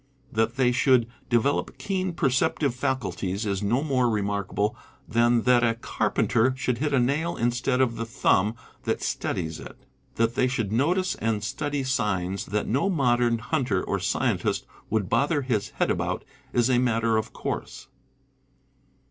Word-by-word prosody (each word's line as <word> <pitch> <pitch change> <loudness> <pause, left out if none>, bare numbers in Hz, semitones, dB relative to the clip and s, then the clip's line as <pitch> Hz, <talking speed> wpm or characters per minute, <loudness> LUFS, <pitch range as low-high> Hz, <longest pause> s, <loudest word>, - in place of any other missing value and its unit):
That 115 -1 0
they 130 -2 +3
should 125 -1 +4 0.2
de 120 - +4
velop 140 +5 0
keen 185 -2 -2
perceptive 135 -2 +1
faculties 120 -6 -2
is 100 -1 -1
no 120 +7 +1
more 130 -5 +2
remarkable 100 +1 -1 0.3
than 120 0 +3
that 125 -1 +4
a 115 -1 +2
carpenter 120 +1 +1
should 125 -3 -1
hit 150 +1 0
a 135 - +3
nail 145 +7 0
instead 120 +2 +1
of 120 -3 +1
the 115 - -2
thumb 110 -3 +2 0.3
that - - -1
steadies 80 -2 -2
it. - - -10 0.4
That 115 0 +1
they 125 - +2
should 115 -6 -2
notice 175 - +1
and 110 -2 -1
study 145 +5 -2
signs 100 -7 -1
that 105 +2 -1
no 140 - +1
modern 120 -8 +2
hunter 120 -5 -1
or - - -1
scientist - - 0 0.2
would 105 -3 0
bother 145 - +1
his 115 -6 -1
head - - 0
about - - -2 0.3
is 120 -1 +2
a 125 -2 +3
matter 115 -2 +2
of 110 - -2
course. - - -5
120 Hz, 155 wpm, -26 LUFS, 110-135 Hz, 0.4 s, should